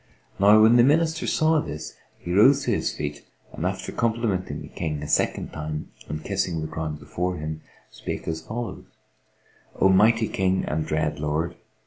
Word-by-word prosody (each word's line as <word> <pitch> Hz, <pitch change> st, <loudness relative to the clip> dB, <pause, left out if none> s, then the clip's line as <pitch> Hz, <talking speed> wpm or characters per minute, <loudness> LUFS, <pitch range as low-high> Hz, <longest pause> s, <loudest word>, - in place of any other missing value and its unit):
Now 105 Hz, +2 st, +7 dB
when 115 Hz, +2 st, +6 dB
the 120 Hz, -, +7 dB
Minister 160 Hz, +4 st, +2 dB
saw 160 Hz, 0 st, +3 dB
this, 75 Hz, -, -7 dB, 0.2 s
he 85 Hz, -, -5 dB
rose 135 Hz, +8 st, +6 dB
to -, -, 0 dB
his -, -, 0 dB
feet 75 Hz, 0 st, -5 dB, 0.3 s
and, -, -, -2 dB
after -, -, -4 dB
complimenting 110 Hz, -5 st, -1 dB
the -, -, -9 dB
King 75 Hz, -2 st, -4 dB
a -, -, -5 dB
second -, -, 0 dB
time 75 Hz, 0 st, -5 dB, 0.2 s
and 75 Hz, +1 st, -4 dB
kissing 85 Hz, -3 st, -1 dB
the 80 Hz, -, -3 dB
ground 80 Hz, -1 st, -4 dB
before 80 Hz, +6 st, -3 dB
him, 80 Hz, 0 st, -5 dB, 0.3 s
spake -, -, -6 dB
as 80 Hz, -1 st, -2 dB
follows, 115 Hz, +6 st, -6 dB, 0.9 s
"O 95 Hz, -, +5 dB
mighty 110 Hz, +4 st, +4 dB
King 95 Hz, -1 st, 0 dB
and 75 Hz, +1 st, -2 dB
dread 75 Hz, -1 st, -1 dB
Lord! 75 Hz, +3 st, -1 dB
90 Hz, 170 wpm, -25 LUFS, 75-110 Hz, 0.9 s, Now